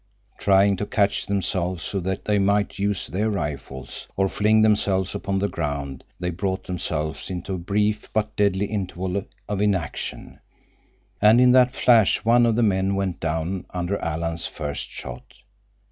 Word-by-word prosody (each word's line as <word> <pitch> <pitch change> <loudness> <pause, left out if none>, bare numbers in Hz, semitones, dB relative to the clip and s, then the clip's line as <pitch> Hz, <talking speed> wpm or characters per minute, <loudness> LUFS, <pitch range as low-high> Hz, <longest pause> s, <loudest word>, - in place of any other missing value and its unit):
Trying 100 0 +4
to 105 - -3
catch 100 -5 +1
themselves 95 -3 -1
so 100 - -2
that 95 +1 -3
they 105 -1 +2
might 100 +1 +1
use 100 -1 0
their 105 +5 -1
rifles, 70 -8 -5
or 95 0 +2
fling 110 +2 +3
themselves 100 -3 +2
upon 95 0 -2
the 100 +1 +1
ground, 70 -6 -4 0.2
they 90 0 -2
brought 95 +2 -2
themselves 80 -3 -3
into 95 +1 -4
a 90 - -3
brief 105 +4 0
but 110 -1 -1
deadly 100 -1 +2
interval 95 -2 -3 0.2
of 100 -1 -2
inaction, 100 -4 -2 0.8
and 110 +3 +6
in 125 0 +6
that 125 0 +5
flash 110 -5 +4
one 120 +1 +5
of 115 - +2
the 120 - +2
men 95 -2 +2
went 95 -3 -2
down 80 +3 -2
under 90 +2 -2
Alan's 85 +1 -2
first 75 -2 -5
shot. 60 0 -9
95 Hz, 160 wpm, -24 LUFS, 90-105 Hz, 0.8 s, and